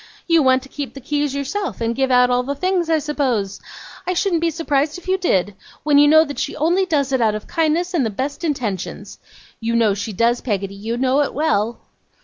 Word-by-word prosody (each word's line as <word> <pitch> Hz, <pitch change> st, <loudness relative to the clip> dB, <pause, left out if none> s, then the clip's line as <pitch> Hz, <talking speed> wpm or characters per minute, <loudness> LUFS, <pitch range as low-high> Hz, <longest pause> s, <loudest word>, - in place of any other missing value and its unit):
You 335 Hz, -2 st, +4 dB
want 260 Hz, -1 st, +3 dB
to -, -, -12 dB
keep 285 Hz, -1 st, -6 dB
the -, -, -7 dB
keys 290 Hz, +1 st, -2 dB
yourself, 345 Hz, +8 st, -3 dB
and 230 Hz, 0 st, -1 dB
give 265 Hz, +1 st, +1 dB
out 250 Hz, 0 st, +4 dB
all 245 Hz, 0 st, +2 dB
the 280 Hz, +3 st, -4 dB
things, 365 Hz, +1 st, 0 dB
I 320 Hz, -, +4 dB
suppose? 265 Hz, -10 st, -2 dB, 0.5 s
I 365 Hz, -, 0 dB
shouldn't 350 Hz, -3 st, +1 dB
be 335 Hz, -, +2 dB
surprised 305 Hz, -1 st, -1 dB
if 360 Hz, -, -13 dB
you 375 Hz, -, +2 dB
did. 205 Hz, -, 0 dB, 0.3 s
When 290 Hz, -1 st, +4 dB
you 290 Hz, -, +6 dB
know 315 Hz, +1 st, +7 dB
that 285 Hz, -1 st, -6 dB
she -, -, -3 dB
only 350 Hz, +5 st, +1 dB
does 280 Hz, -5 st, 0 dB
it 260 Hz, -2 st, +1 dB
out 215 Hz, -2 st, +2 dB
of 215 Hz, -, -6 dB
kindness 330 Hz, +3 st, 0 dB
and 325 Hz, -6 st, +2 dB
the 225 Hz, -, 0 dB
best 270 Hz, -, -4 dB
intentions! 235 Hz, -, -4 dB, 0.4 s
You 230 Hz, +1 st, -1 dB
know 225 Hz, -3 st, +3 dB
she 205 Hz, +3 st, -4 dB
does, 235 Hz, +4 st, +1 dB
Peggotty 200 Hz, -4 st, -2 dB
you 220 Hz, +4 st, -4 dB
know 260 Hz, +3 st, +2 dB
it 285 Hz, -, -2 dB
well. 235 Hz, -7 st, 0 dB
275 Hz, 225 wpm, -20 LUFS, 235-315 Hz, 0.5 s, know